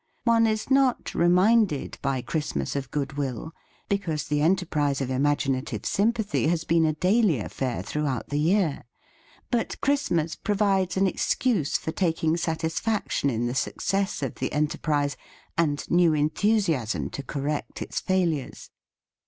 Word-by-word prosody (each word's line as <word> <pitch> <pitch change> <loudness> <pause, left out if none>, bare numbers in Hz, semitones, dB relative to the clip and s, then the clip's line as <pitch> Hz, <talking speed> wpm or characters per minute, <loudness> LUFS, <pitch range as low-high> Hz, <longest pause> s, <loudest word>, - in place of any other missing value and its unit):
One 230 -1 +4
is 215 +3 -2
not 270 -2 +2
reminded 180 -1 +3
by 135 -3 -1
Christmas 140 - -2
of 135 -2 -3
goodwill, 140 0 -3 0.4
because 170 -7 -1
the 145 0 -1
enterprise 155 -5 +1
of 135 -2 -2
imaginative 135 0 0
sympathy 210 -4 +1
has 165 0 +1
been 165 0 +3
a 155 - +1
daily 185 - +3
affair 125 +3 -3
throughout 145 -5 -2
the 145 - -1
year; 165 -3 +1 0.7
but 240 -2 -1
Christmas 275 - 0
provides 195 -3 +1
an 195 - +3
excuse 190 - +1
for 160 - -4
taking 165 -2 +1
satisfaction 165 +1 -1
in 120 -1 -1
the 120 - -1
success 195 +6 -1
of 135 - -2
the 130 - -3
enterprise 150 -1 0 0.4
and 150 -3 0
new 175 -2 +4
enthusiasm 150 - +1
to - - -5
cor 140 0 -5
rect 150 +1 -3
its - - -3
failures. 170 -7 -1
160 Hz, 135 wpm, -26 LUFS, 140-195 Hz, 0.7 s, One